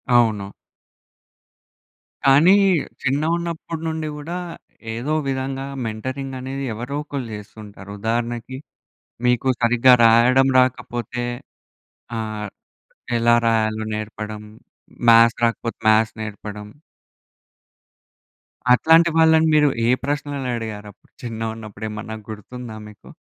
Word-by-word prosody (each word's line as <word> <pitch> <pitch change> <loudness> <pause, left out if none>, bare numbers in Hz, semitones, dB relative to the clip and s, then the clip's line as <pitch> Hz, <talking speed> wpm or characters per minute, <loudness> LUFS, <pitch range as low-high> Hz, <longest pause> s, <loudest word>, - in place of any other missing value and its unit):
అవును. 110 -5 +2 1.7
కానీ 145 +8 +6 0.5
చిన్నగున్నప్పుడు 165 +3 -2
నుండి 160 -1 -3
గూడా, 165 +4 -5 0.6
ఏదో 130 +7 -2
విధంగా 135 0 -3 0.2
మెంటరింగ్ 130 +5 -5
అనేది 135 +2 -5
ఎవరో 120 +6 -5
ఒకళ్ళు 140 -5 -5
చేస్తుంటారు. 100 -1 -11
ఉదాహరణకి, 120 +3 -2 0.7
మీకు 125 +2 +2
సరిగ్గా 120 +2 +5
రాయడం 125 +4 +5
రాకపోతే 125 -1 -1 1.0
ఆహ్, 110 -1 -4 0.7
ఎలా 120 0 +4
రాయాలో 110 -1 +1
నేర్పడం, 105 0 -6 0.7
మ్యాథ్స్ 115 0 +6
రాకపోతే, 115 0 -2
మ్యాథ్స్ 110 0 +3
నేర్పడం. 105 -1 -7 2.1
అట్లాంటి 165 +6 +5
వాళ్ళని 160 0 +5
మీరు 150 -1 +5 0.2
ఏ - - +3
ప్రశ్నలు 140 -2 -3
అడిగారు 110 -2 -6
అప్పుడు. - - -30
చిన్నగా 115 -1 -4
ఉన్నప్పుడు 110 -1 -8
ఏమన్నా 110 +1 -6
గుర్తుందా 110 +1 -8
మీకు? 105 - -15
120 Hz, 95 wpm, -21 LUFS, 110-135 Hz, 2.1 s, కానీ